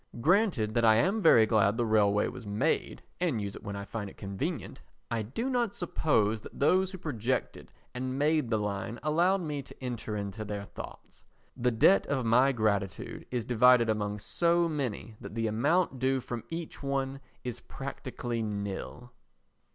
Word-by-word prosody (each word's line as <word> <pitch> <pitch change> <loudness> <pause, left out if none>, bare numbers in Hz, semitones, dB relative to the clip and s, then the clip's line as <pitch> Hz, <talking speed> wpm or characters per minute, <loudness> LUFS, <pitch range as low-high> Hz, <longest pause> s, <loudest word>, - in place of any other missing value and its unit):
Granted 160 - +2
that 115 - +2
I 110 -1 +7
am 195 - +2
very 120 - +7
glad 105 -1 +3
the 120 - +1
railway 105 -2 +3
was 125 -4 -8
made 100 +1 -1 0.2
and 165 -10 +1
use 100 -1 -4
it - - -9
when 100 -1 -6
I 100 0 -5
find 105 -2 -5
it - - -16
convenient, 100 -1 -4 0.3
I 115 -1 0
do 135 - -3
not 240 -5 0
suppose 110 - +1
that - - -11
those 185 +6 +3
who 190 - -7
projected 130 - -3 0.2
and 130 +1 -3
made 150 -3 +2
the 110 - +2
line 105 +2 -3
allowed 175 +5 +3
me 150 -4 -3
to 135 - -12
enter 120 -4 -4
into 100 +1 -4
their 100 -1 -5
thoughts; - - -11 0.3
the 125 +1 +1
debt 110 -4 +4
of 135 -4 -1
my 125 +4 +5
gratitude 105 -5 -1
is 120 -3 -2
divided 125 -1 +5
among 105 -1 -2
so 170 +10 +2
many 125 -8 -4
that - - -8
the 115 -1 0
amount 130 +7 +1
due 130 +1 +2
from 120 -2 -6
each 165 0 -6
one 135 -1 -2 0.2
is 125 -2 -4
practically 130 -3 -5
nil. 105 +3 -5
120 Hz, 175 wpm, -30 LUFS, 105-145 Hz, 0.3 s, I